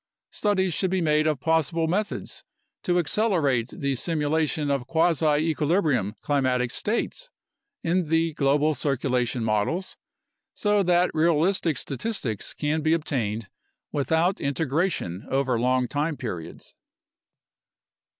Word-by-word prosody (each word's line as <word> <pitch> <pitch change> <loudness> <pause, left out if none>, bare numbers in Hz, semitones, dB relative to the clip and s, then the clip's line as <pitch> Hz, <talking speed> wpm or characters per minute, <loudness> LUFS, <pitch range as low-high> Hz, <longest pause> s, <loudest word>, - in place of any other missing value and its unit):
Studies 190 -4 +1
should 190 - 0
be 190 +1 0
made 155 -2 +2
of 150 -4 0
possible 160 +2 +1
methods 205 +5 -3 0.4
to 175 -1 +1
accelerate 160 - +1
the 140 +1 -2
simu 150 +3 -1
lation 155 -2 0
of 135 -3 -1
quasi 160 -2 +2
equilibrium 150 - +1
climatic 130 -4 +1
states 235 - -2 0.5
in 170 -1 0
the 165 0 +2
global 145 +2 +2
circulation 130 -3 -1
models, 110 - -1 0.6
so 205 -1 +2
that 180 -1 +2
realistic 165 0 +2
statistics 135 - -3
can 155 +1 -1
be 160 +1 +2
obtained 115 -10 -2 0.4
without 160 +6 +1
integration 140 - -1
over 135 -3 +1
long 125 +1 +2
time 150 +2 -2
periods. 90 -10 -7
155 Hz, 115 wpm, -25 LUFS, 130-170 Hz, 0.6 s, made